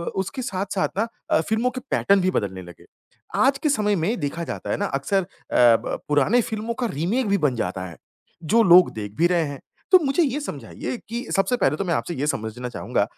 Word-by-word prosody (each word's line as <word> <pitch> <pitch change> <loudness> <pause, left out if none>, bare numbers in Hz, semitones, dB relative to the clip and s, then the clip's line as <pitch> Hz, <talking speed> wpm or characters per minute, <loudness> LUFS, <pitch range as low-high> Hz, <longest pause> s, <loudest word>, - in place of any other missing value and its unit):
उसके 195 +8 -3
साथ-साथ 195 -5 -2
ना 225 +3 +1 0.2
अ, - - +3
फ़िल्मों 225 +3 +1
के 255 0 -6
पैटर्न 200 0 +3
भी 185 +1 +1
बदलने 95 - -2
लगे। 90 -2 -13 0.5
आज 270 +1 +3
के 305 - +3
समय 210 -6 +2
में 185 +6 -1
देखा 165 +3 -3
जाता - - -6
है - - 0
ना 205 - -1
अक्सर 190 +5 0
अ, - - -7 0.3
ब 120 -2 +4
पुराने 150 - +3
फ़िल्मों 220 +1 -4
का - - +1
रीमेक 205 - 0
भी 200 0 +2
बन 145 -8 +1
जाता 95 -4 -3
है, 85 -3 -10 0.5
जो 225 +9 +4
लोग 180 -2 +7
देख 105 -2 -6
भी 170 - +4
रहे 175 -2 +2
हैं। 140 -2 -6 0.3
तो 370 - +9
मुझे 275 +5 +2
ये 285 -1 -1
समझाइए 285 - -6
कि 235 +2 -3
सबसे 195 +5 +2
पहले 145 - +2
तो - - -1
मैं 170 - 0
आपसे 175 - -2
ये 145 +1 -2
समझना 120 -2 -3
चाहूँगा 120 - -1
185 Hz, 220 wpm, -23 LUFS, 140-230 Hz, 0.5 s, तो